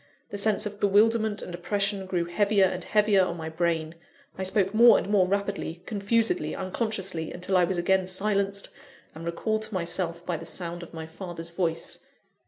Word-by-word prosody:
The 205 - -4
sense 215 +1 +2
of 205 0 -6
bewilderment 215 +1 +3
and 180 - -7
oppression 195 +2 -1
grew 175 -2 0
heavier 200 +3 +3
and 185 - -2
heavier 210 -2 +3
on 175 -1 -2
my 160 -1 -5
brain; 160 -1 -1 0.4
I 190 - -4
spoke 190 +1 +1
more 235 +2 +8
and - - -2
more 200 -3 +3
rapidly, 200 -3 -2
confusedly, 210 -6 +1
unconsciously, 190 -4 -3
until 180 +2 -2
I 180 -1 +5
was 185 +1 -1
again 185 +2 +2
silenced 200 +1 0 0.4
and 160 +1 -9
recalled 215 +6 -1
to 215 - -4
myself 170 -1 -2
by 175 - -1
the - - -9
sound 175 -1 -5
of 170 - -10
my 160 -1 -6
father's 170 0 -7
voice. 170 -2 -2
190 Hz, 180 wpm, -27 LUFS, 170-205 Hz, 0.4 s, more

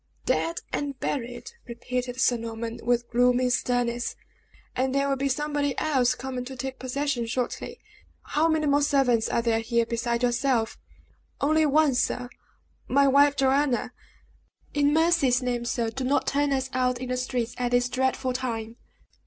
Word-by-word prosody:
"Dead 335 +1 0
and 280 -2 -3
buried!" 245 - -4 0.2
repeated 245 +1 -4
Sir 250 - +3
Norman, 230 0 -5
with 240 0 0
gloomy 250 +1 +3
sternness, 245 -1 0 0.6
"and 260 +1 0
there 275 0 +2
will 275 - +1
be 275 +1 -1
somebody 290 0 -1
else 260 -5 +2
coming 255 0 -5
to 265 +1 -7
take 265 +1 -5
possession 260 -2 -2
shortly. 245 +1 -3 0.4
How 305 +3 +1
many 315 -1 +1
more 285 0 +3
servants 265 -6 +2
are 235 - 0
there 230 -1 +2
here 235 +1 +1
beside 235 +1 -2
yourself?" 240 -2 +1 0.6
"Only 310 +2 +3
one, 300 -1 +3
sir 250 0 -1 0.6
my 280 +1 +4
wife 285 +1 +5
Joanna. 270 -1 +1 0.8
In 290 0 +3
mercy's 300 -6 +3
name, 245 -1 -1
sir, 235 -1 -1
do 265 +2 -4
not 275 +3 +1
turn 285 0 +1
us 265 -1 -1
out 250 -1 +1
in 255 0 -6
the 255 - 0
streets 250 -2 -2
at 245 -1 0
this 245 0 +2
dreadful 260 0 0
time!" 230 -3 -4
255 Hz, 160 wpm, -26 LUFS, 240-280 Hz, 0.8 s, wife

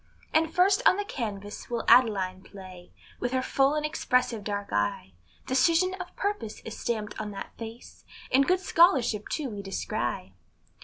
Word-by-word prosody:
And 320 0 +3
first 380 +3 +3
on 370 - +5
the 410 - -2
canvass 210 - -6
we'll 235 -2 -2
Adeline 195 -6 +4
place, 185 -2 -12 0.3
With 245 +1 -2
her 260 0 +1
full 275 +3 +2
and 300 0 -1
expressive 250 -7 0
dark 205 -1 -4
eye; 105 -2 -1 0.3
Decision 335 +8 +3
of 365 - -8
purpose 400 - -3
is 225 - -8
stamped 215 -3 -3
on 210 - -4
that 195 - -8
face, 230 +1 -10 0.3
And 270 +1 +4
good 365 +1 +2
scholarship 270 - +3
too 285 -6 -3
we 205 -1 -6
descry. 190 - -3
235 Hz, 160 wpm, -27 LUFS, 200-305 Hz, 0.3 s, on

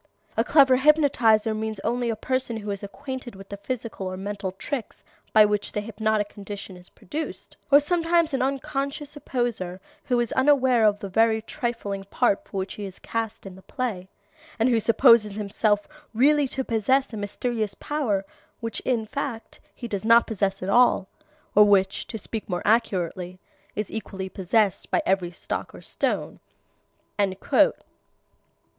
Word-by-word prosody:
A 225 - +2
clever 270 -1 +5
hypnotizer 250 -7 +4
means 215 -1 -3
only 240 +2 -1
a 225 - 0
person 255 0 -2
who 210 -1 -5
is 200 - -3
acquainted 260 +3 -7
with 195 0 -12
the 200 - -6
physical 225 -2 -5
or 185 0 -5
mental 200 0 -4
tricks 245 +5 -5 0.3
by 215 -1 +7
which 210 0 -1
the - - -1
hypnotic 215 -1 -1
condition 200 -2 -8
is 180 0 -11
produced; 310 - -7
or 285 0 +8
sometimes 335 +1 +1
an 265 - 0
unconscious 275 +2 -2
imposter 240 -10 -3 0.3
who 245 -2 +1
is 240 -2 -1
unaware 260 -4 +4
of 205 0 +1
the 200 - -4
very 220 +3 +3
trifling 220 -3 -4
part 200 +1 +1
for - - -7
which 190 0 -3
he 205 - -6
is 190 -1 -8
cast 225 -2 -4
in 195 - -8
the 190 - -14
play, 210 -6 -4 0.5
and 230 +2 +3
who 235 -2 +3
supposes 230 -2 +5
himself 205 0 0 0.3
really 290 +4 +4
to 265 +1 -3
possess 245 +3 +1
a - - -4
mysterious 210 0 -2
power 230 -10 -1 0.3
which 230 -1 -4
in 235 -4 -1
fact 240 -1 -5 0.2
he 240 - -6
does 200 -3 -3
not 230 +1 +6
possess 195 -3 -1
at 185 - -3
all, 235 -3 +4 0.4
or 210 - +8
which, 195 -2 +2
to 225 - -5
speak 220 +1 -6
more 175 -1 -2
accurately, 185 -4 0 0.4
is 210 -1 -3
equally 195 -3 -5
possessed 195 +1 0
by - - +1
every 190 -2 +1
stock 175 - -5
or - - -11
stone." - - -2
220 Hz, 160 wpm, -25 LUFS, 200-255 Hz, 0.5 s, or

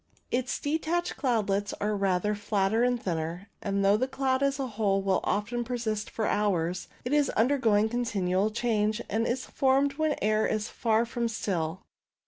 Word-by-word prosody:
Its 250 0 0
detached 325 +4 -1
cloudlets 205 -6 0
are 210 +1 0
rather 195 +1 +1
flatter 205 +1 0
and 245 -1 +1
thinner, 170 +2 -3
and 200 -1 0
though 200 +1 +5
the 255 +4 0
cloud 265 0 0
as 275 0 +1
a 270 - 0
whole 205 -4 0
will 195 -1 +2
often 235 +4 -1
persist 225 -3 -3
for 220 - -2
hours, 180 -5 0 0.2
it 250 - -1
is 295 -1 +3
undergoing 225 -4 +3
con 240 +2 -1
tinual 195 -1 0
change, 215 -1 0
and 225 +3 +1
is 255 +2 -1
formed 275 +2 +1
when 315 0 +2
the 295 - -3
air 215 +1 +2
is 215 0 -1
far 225 0 +1
from 235 0 -2
still. 185 -6 -2
220 Hz, 175 wpm, -28 LUFS, 200-250 Hz, 0.2 s, though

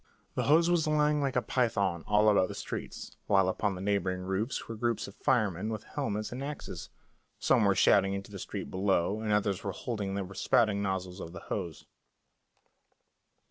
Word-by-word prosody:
The - - -1
hose 165 +4 +5
was 175 -3 +2
lying 150 -1 +2
like 135 -2 -1
a 125 - +2
python 100 -9 0
all 105 +1 +4
about 100 -3 +4
the - - -7
streets, - - -6
while 95 -2 +4
upon 95 +1 0
the 90 - -7
neighbouring 95 -2 0
roofs 95 +7 -2
were 115 - -5
groups 115 0 -1
of 100 - -10
firemen 110 - +1
with 110 -1 -4
helmets 110 -7 -3
and 125 +3 -5
axes; 145 0 -6 0.5
some 110 - +3
were 100 -1 +4
shouting 95 0 +4
into 100 +1 -7
the 100 - -7
street - - -6
below, 95 +1 +1
and 110 -1 -1
others 100 -2 +1
were 100 -2 -3
holding 105 -5 -3
the 100 -2 -3
spouting 100 -1 +2
nozzles 95 -2 -3
of 85 - -7
the - - -7
hose. 85 -6 -5
105 Hz, 180 wpm, -30 LUFS, 95-120 Hz, 0.5 s, hose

